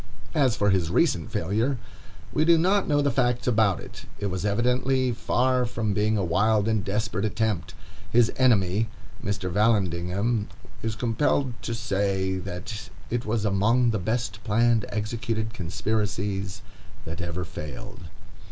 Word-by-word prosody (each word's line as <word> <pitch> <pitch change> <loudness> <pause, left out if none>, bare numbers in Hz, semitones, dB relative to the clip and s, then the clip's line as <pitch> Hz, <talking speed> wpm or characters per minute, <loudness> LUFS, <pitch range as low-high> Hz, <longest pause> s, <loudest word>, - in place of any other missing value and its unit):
As 135 -6 +3
for 105 -4 +2
his 90 -4 +1
recent - - +1
failure, 110 +10 0 0.6
we 155 - +3
do 165 +1 +6
not 190 +4 +2
know 145 -1 +3
the 140 - +2
facts 125 -2 +1
about 110 -6 +3
it. - - -11
It 100 -2 -2
was 95 0 -3
evidently 125 +4 +2
far 125 +2 +1
from 115 -3 -1
being 105 +2 +1
a 100 - 0
wild 105 +5 +2
and 110 -3 +1
desperate 100 0 -1
attempt. 110 -2 -1 0.3
His 120 -1 +4
enemy, 110 -4 +3 0.4
Mr. 100 -2 -2
Vallandigham, 100 +1 +1 0.3
is 110 -1 -2
compelled 125 +3 +1
to 115 - -3
say, 95 -3 0
that 95 +3 -6 0.2
"it 120 -1 -1
was 110 -1 0
among 115 +5 +3
the 110 - -1
best 110 0 -2
planned 115 0 +3
and - - -10
executed 110 +1 -2
conspiracies 100 -1 -2 0.4
that 80 +3 -5
ever 85 +1 -3
failed." 75 0 -8
110 Hz, 145 wpm, -26 LUFS, 100-120 Hz, 0.6 s, do